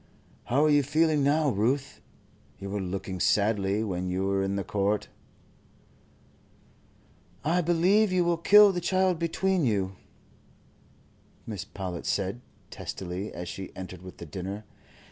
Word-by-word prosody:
"How 135 +5 +2
are - - +4
you 145 0 +5
feeling 155 +1 +2
now, 145 +2 +3
Ruth? 130 +6 -1 0.6
You 100 0 -7
were 100 0 -2
looking 95 0 -4
sadly 100 +1 +2
when 90 -3 -3
you 95 +1 -1
were 100 0 +1
in 95 0 -1
the 100 - -1
court." 105 0 -1 2.4
"I 170 +4 +2
believe 180 +5 +3
you 180 -1 +3
will 170 -1 +1
kill 205 +4 +7
the 180 -2 -3
child 185 -1 +1
between 180 +2 0
you," 100 -6 0 1.5
Mrs. 105 -5 -5
Powlett 90 -3 -5
said, 100 +4 -1 0.3
testily, 95 +2 -5
as 90 0 -7
she 95 +1 -7
entered 95 -1 -8
with 90 0 -11
the 85 - -8
dinner. 95 +6 -6
105 Hz, 140 wpm, -27 LUFS, 95-160 Hz, 2.4 s, kill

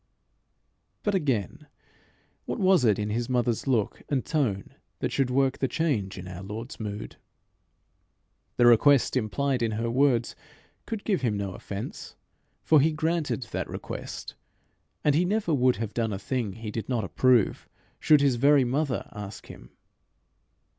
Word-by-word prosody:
But, 205 - 0
again, 150 - -1 0.8
what - - -3
was 190 - +4
it 110 -4 +4
in 105 0 -2
his 120 +3 -2
mother's 120 -1 0
look 115 -6 0
and 135 -3 0
tone 115 - -1 0.2
that - - -2
should 135 -2 +1
work 135 +1 +1
the 135 - +1
change 125 - -1
in 90 0 -8
our 90 0 -7
Lord's 110 +6 -7
mood? 105 -1 -6 1.4
The 120 - +5
request 125 +4 +5
implied 130 +3 0
in 115 -2 0
her 115 +2 -2
words 125 -2 +2 0.5
could 225 -3 -4
give 195 -4 0
him 110 -5 0
no 100 -2 -3
offence, 100 +3 -7 0.5
for 155 -3 +5
he 160 +3 +3
granted 160 -3 -1
that - - -3
request; - - -7 0.7
and 150 - +4
he 160 +5 +3
never 195 -2 0
would 130 -2 +3
have 110 -2 -4
done 115 -2 -1
a - - -2
thing 110 0 -3
he 110 0 -7
did 110 +1 -5
not 120 -4 0
approve, 120 +3 +2 0.3
should 150 -2 +5
his 135 -4 +3
very 140 +2 +5
mother 135 +1 -1
ask 105 -1 -8
him. - - -12
125 Hz, 155 wpm, -27 LUFS, 110-145 Hz, 1.4 s, The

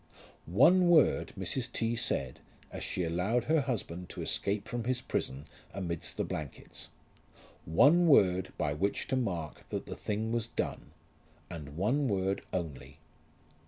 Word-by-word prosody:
One 170 - +5
word 160 -5 +4
Mrs. 120 +7 -3
T. 115 0 -1
said 70 - -1 0.3
as - - -6
she 90 - -2
allowed 90 +8 0
her 155 +3 +3
husband 90 -9 -4
to - - -6
escape 100 +2 -1
from 120 -2 -3
his 125 0 0
prison 70 - -3 0.3
amidst 85 -4 -4
the - - +1
blankets, 75 -3 -7 0.8
one 150 - +5
word 95 - +4
by 75 - 0
which 100 +7 -1
to 130 - +1
mark 90 -11 -3
that - - -3
the - - -6
thing 110 +2 -2
was 115 -1 -1
done, - - -4 0.6
and 75 -3 -8
one 130 +10 +1
word 95 -2 0
only. 75 -5 -5
100 Hz, 145 wpm, -31 LUFS, 85-125 Hz, 0.8 s, One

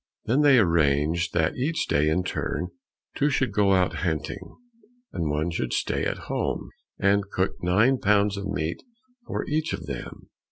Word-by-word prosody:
Then 130 +6 +2
they 145 -3 +6
arranged 85 -2 +2
that 80 0 +1
each 155 +6 -1
day, 75 +2 +2
in 90 +4 +1
turn, 90 0 -3 0.5
two 145 - +2
should 130 -5 0
go 100 -1 +3
out 90 -1 +2
hunting, 80 -4 -3 0.6
and 80 -3 -2
one 75 +3 -1
should 65 -7 -2
stay - - 0
at - - -2
home, - - -2 0.3
and 100 0 +2
cook 95 0 -1
nine 105 +9 +3
pounds 100 0 +3
of 100 0 -4
meat 80 -1 -3 0.5
for - - -3
each 155 +1 -1
of - - -5
them. - - -8
95 Hz, 165 wpm, -25 LUFS, 80-105 Hz, 0.6 s, they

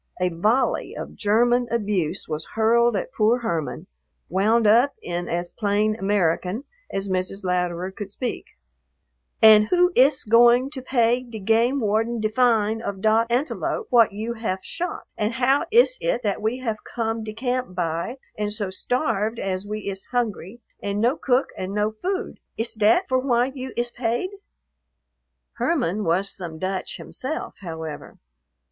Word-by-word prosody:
A 180 0 +2
volley 210 +10 0
of - - -6
German 240 +3 +2
abuse 205 -8 -1
was 155 +1 -4
hurled 230 +1 +3
at 200 +7 -3
poor 230 +1 +2
Herman, 170 -5 -3 0.4
wound 215 +5 +2
up 240 +7 +5
in 175 0 -4
as 175 +1 -2
plain 210 0 +1
American 195 +2 0 0.3
as 195 0 -2
Mrs. 185 +1 -2
Louderer 180 0 -1
could 200 0 -7
speak: 240 +4 -4 1.0
"And 215 -1 +8
who 360 0 +4
iss 275 +1 +4
going 240 +4 +5
to 270 -3 -6
pay 245 -1 +2
de 240 -3 -9
game 230 +6 +2
warden 225 +2 0
de 215 0 0
fine 225 -2 +2
of 200 -4 -4
dot 220 +3 +3
antelope 290 - -1
what 235 -4 +6
you 220 +4 -4
haf 220 -5 -3
shot? 355 +1 -4
And 215 +1 -1
how 260 +5 +2
iss - - +4
it - - 0
that 205 -1 -1
we 220 +4 0
haf 230 -4 -3
come 225 -1 -3
de 215 0 -6
camp 250 -3 -2
by 170 +7 -2 0.2
und 210 0 -1
so 205 -3 -3
starved 225 0 -1
as 190 -1 -3
we 210 0 -5
iss 195 -1 -5
hungry, 240 -3 -3 0.2
and 200 0 -2
no 240 +6 +2
cook 260 -3 +1
und 190 +2 -5
no 210 +1 +1
food? 370 - -4 0.2
Iss 225 0 -2
dat 225 - +3
for 260 0 +2
why 255 0 +1
you 260 -1 -6
iss 240 0 -1
paid?" 240 - -2 1.3
Herman 215 - 0
was 185 +3 +1
some 170 -4 -7
Dutch 185 +2 -3
himself, 300 +5 -5
however. 160 -5 -7
220 Hz, 160 wpm, -23 LUFS, 195-245 Hz, 1.3 s, And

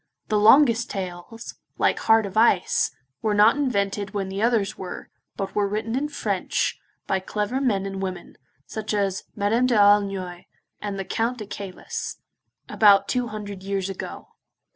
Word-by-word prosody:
The 210 - +2
longest 235 +1 +5
tales, 185 +4 -6 0.2
like - - +2
Heart 225 -1 +4
of 195 - -7
Ice, 450 - +3 0.3
were 215 -2 +1
not 210 +3 +6
invented 205 -6 -1
when 195 -2 -2
the 195 +1 -4
others 220 -3 +1
were, 185 -1 -8 0.3
but 195 -1 -4
were 205 -1 +1
written 215 +3 -2
in 290 +3 -1
French, - - -1 0.3
by 190 - 0
clever 210 +7 -2
men 205 -8 +1
and 195 -1 -5
women, 185 -2 -5 0.3
such 215 -1 -4
as 195 -2 -1
Madame 220 +5 +2
d'Aulnoy, 200 -5 +2 0.4
and 205 -1 -4
the 195 - -4
Count 230 +5 -1
de 215 - -6
Caylus, 195 -2 -6 0.5
about 200 -2 +5
two 250 -1 0
hundred 205 -3 -7
years 195 0 -2
ago. 190 - -8
205 Hz, 155 wpm, -24 LUFS, 195-225 Hz, 0.5 s, not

